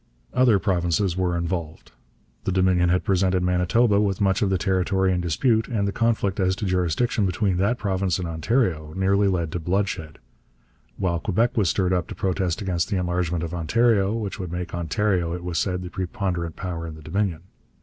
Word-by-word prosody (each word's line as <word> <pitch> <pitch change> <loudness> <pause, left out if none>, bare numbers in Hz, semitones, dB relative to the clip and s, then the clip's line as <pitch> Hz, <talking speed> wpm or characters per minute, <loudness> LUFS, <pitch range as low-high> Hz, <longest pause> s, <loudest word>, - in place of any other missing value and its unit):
Other 125 -5 +4
provinces 90 -2 0
were 90 -2 0
involved. 85 -2 -4 0.5
The - - 0
Dominion 90 -1 +3
had 90 +1 +2
presented 95 -2 +1
Manitoba 100 +4 +3
with 100 -1 0
much 95 -2 +2
of 100 - +2
the 95 - +2
territory 95 0 +1
in 90 - 0
dispute, 110 - +1
and 105 -5 -1
the - - 0
conflict 110 -3 0
as 95 0 +2
to 105 - -4
jurisdiction 95 +4 +1
between 95 0 0
that 105 +6 +1
province 95 -5 0
and 90 -2 -3
Ontario 80 - 0
nearly 100 +1 +3
led 85 -4 0
to 90 - -3
bloodshed; 90 -3 -2 0.8
while 85 -3 0
Quebec 115 +7 0
was 100 -7 +2
stirred 95 +1 +1
up 90 -3 0
to - - -7
protest 95 -1 -1
against 90 -3 -1
the 100 - 0
enlargement 90 -2 -1
of 85 0 -4
Ontario, 100 +4 +2
which 110 -2 -4
would 90 -3 -5
make 90 0 -5
Ontario, 85 0 0
it 90 - -7
was 90 -2 -2
said, 90 -2 -1
the 90 - -7
preponderant 90 -3 -3
power 85 -3 -5
in 80 - -7
the 80 - -13
Dominion. 85 0 -2
95 Hz, 190 wpm, -24 LUFS, 85-100 Hz, 0.8 s, Other